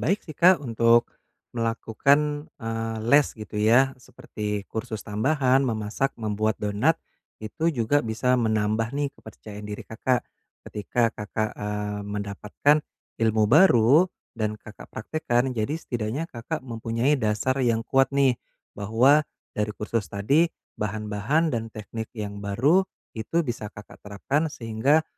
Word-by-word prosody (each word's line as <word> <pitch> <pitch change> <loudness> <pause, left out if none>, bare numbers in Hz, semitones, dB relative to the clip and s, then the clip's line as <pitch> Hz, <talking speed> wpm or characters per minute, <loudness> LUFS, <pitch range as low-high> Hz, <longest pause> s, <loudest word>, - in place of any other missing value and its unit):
baik 195 +5 +1
sih 155 -4 -10
Kak, 180 -3 +5
untuk 115 -1 +3 0.4
melakukan, 140 +6 +1 0.2
eee, 115 0 -3
les 145 0 +6
gitu 110 -1 -8
ya, 110 +4 +6 0.2
seperti 105 -4 -5
kursus 110 -1 -4
tambahan 130 +5 +2
memasak 110 +4 -1
membuat 110 -1 -1
donat, 105 +10 +2 0.5
itu 110 +9 -5
juga 125 +3 +2
bisa 115 +3 +1
menambah 110 -1 +1
nih 145 -1 0
kepercayaan 105 -1 -10
diri 105 - -5
Kakak, 125 +3 0 0.5
ketika 115 +3 0
Kakak, 110 0 -3
eee, 105 0 -3
mendapatkan 105 +7 0 0.4
ilmu 110 -1 +3
baru 150 0 +6 0.3
dan 110 -2 -2
Kakak 105 0 -13
praktekkan. 125 +1 -1
Jadi 115 +5 -1
setidaknya 120 0 -3
Kakak 130 +7 -4
mempunyai 115 +3 0
dasar 110 +5 0
yang 115 -2 +2
kuat 135 0 +3
nih, 135 -3 +3 0.3
bahwa 115 +8 +4 0.3
dari 105 0 -2
kursus 105 -2 -2
tadi, 140 - +2 0.3
bahan-bahan 105 - 0
dan 115 -2 -2
teknik 110 0 -7
yang 100 -1 -5
baru 135 - +2 0.3
itu 165 +10 -1
bisa 115 -5 -4
Kakak 105 0 -13
terapkan, 135 +10 -1
sehingga, 130 +6 +1
115 Hz, 130 wpm, -25 LUFS, 105-135 Hz, 0.5 s, les